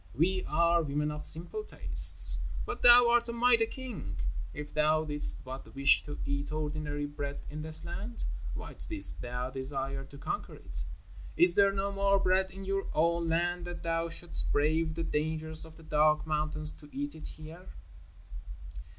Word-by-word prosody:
"We 185 +6 +1
are 170 +2 +2
women 150 0 -2
of 150 0 -1
simple 175 - +2
tastes, - - +6 0.3
but 420 - -6
thou 245 0 +8
art 240 0 +2
a - - -3
mighty 235 -1 +3
king. 220 - -7 0.4
If 150 0 -9
thou 155 +1 +2
didst 150 -1 +2
but 130 +1 -10
wish 140 0 +5
to 145 - -7
eat 140 +1 -3
ordinary 150 -1 -3
bread 145 -1 -6
in 155 +1 -6
this 155 0 -2
land, 205 +7 -6 0.3
why - - -7
didst 320 -3 0
thou 125 +1 -5
desire 135 0 -5
to 140 +1 -13
conquer 145 - -5
it? - - -9 0.5
Is 175 0 +6
there 200 +1 +4
no 195 0 -2
more 200 0 +2
bread 190 0 +1
in 195 0 -10
your 195 0 -2
own 170 +1 +1
land 175 +1 -1
that 175 0 -7
thou 165 0 -1
shouldst 170 +1 -4
brave 155 +2 +1
the 165 - -3
dangers 160 +1 -2
of 160 0 -15
the 165 - -15
dark 155 0 +2
mountains 155 0 +1
to 150 - -15
eat 145 +1 -5
it 160 - -10
here?" 160 +4 -12
160 Hz, 170 wpm, -30 LUFS, 150-185 Hz, 0.5 s, thou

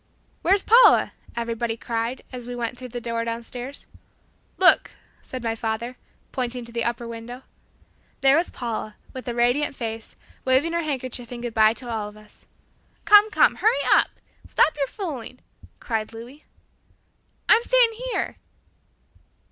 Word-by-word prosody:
"Where's 390 +3 +3
Paula?" 475 +3 +6 0.2
everybody 230 -1 -2
cried, 230 +2 -3
as 245 -1 -7
we 245 - -5
went 240 0 -3
through 255 +1 -9
the 245 0 -6
door 230 -1 -2
downstairs. 240 +3 -6 0.7
"Look," 370 -1 +5 0.3
said 255 -2 -7
my 225 -1 0
father, 225 +2 -3 0.4
pointing 250 -1 -3
to 235 - -9
the 235 0 -2
upper 235 0 -2
window. 235 +2 -8 0.8
There 270 0 +6
was 335 +3 +2
Paula, 220 -3 -5 0.2
with 255 -2 -8
a 240 - -3
radiant 245 +5 +1
face, 225 -2 -6 0.3
waving 265 +6 +2
her 340 - +1
handkerchief 255 -5 -4
in 240 -1 -6
good 240 -1 -4
bye 220 0 +5
to 250 - -6
all 220 -3 -3
of 210 - -16
us! 215 0 -18 0.6
"Come, 415 +1 +7
come, 440 - +4
hurry 485 +3 +2
up; - - +5 0.4
stop - - +3
your 280 -2 -1
fooling!" 265 - -6 0.4
cried 225 -2 -3
Louis. 245 +6 -11 1.0
"I'm 455 - +6
staying 485 -1 +4 0.2
here." - - -2
245 Hz, 150 wpm, -24 LUFS, 230-275 Hz, 1.0 s, Come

